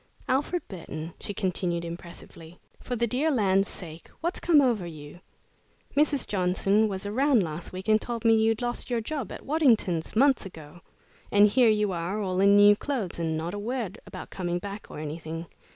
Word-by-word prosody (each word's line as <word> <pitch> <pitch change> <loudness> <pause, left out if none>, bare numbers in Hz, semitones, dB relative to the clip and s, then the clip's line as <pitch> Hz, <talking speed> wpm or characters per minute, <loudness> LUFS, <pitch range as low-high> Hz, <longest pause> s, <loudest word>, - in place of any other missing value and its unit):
"Alfred 290 +7 0
Burton," 165 -3 -7
she - - -5
continued, 180 -3 -2
impressively, 170 0 -10 0.2
"for 250 - -4
the 235 0 +1
dear 255 +7 0
land's 195 -7 +2
sake, 165 -2 -9
what's 345 +3 -2
come 330 -4 +5
over 235 -10 +2
you? 155 0 -10 0.8
Mrs. 290 -2 +2
Johnson 195 +3 +2
was 195 -1 -5
around 250 +2 +3
last 165 0 -6
week 185 +2 -7
and 215 0 +4
told 235 -1 -5
me 225 - +6
you'd 225 +1 +2
lost 240 +1 -2
your 240 -1 0
job 255 -1 -4
at - - -9
Waddington's 230 - +2
months 270 +3 +4
ago. 165 -3 -11 0.5
And 205 0 +7
here 230 +3 +4
you 210 -2 +2
are, 175 +4 -2
all 185 -3 -1
in 200 +1 +6
new 205 0 +7
clothes, 220 -9 -3
and 160 -1 -1
not 165 +3 -4
a 205 - -4
word 225 -2 -4
about - - -9
coming 175 -2 -2
back 200 +3 -7
or - - -9
anything. 160 +2 -5
205 Hz, 185 wpm, -27 LUFS, 175-235 Hz, 0.8 s, And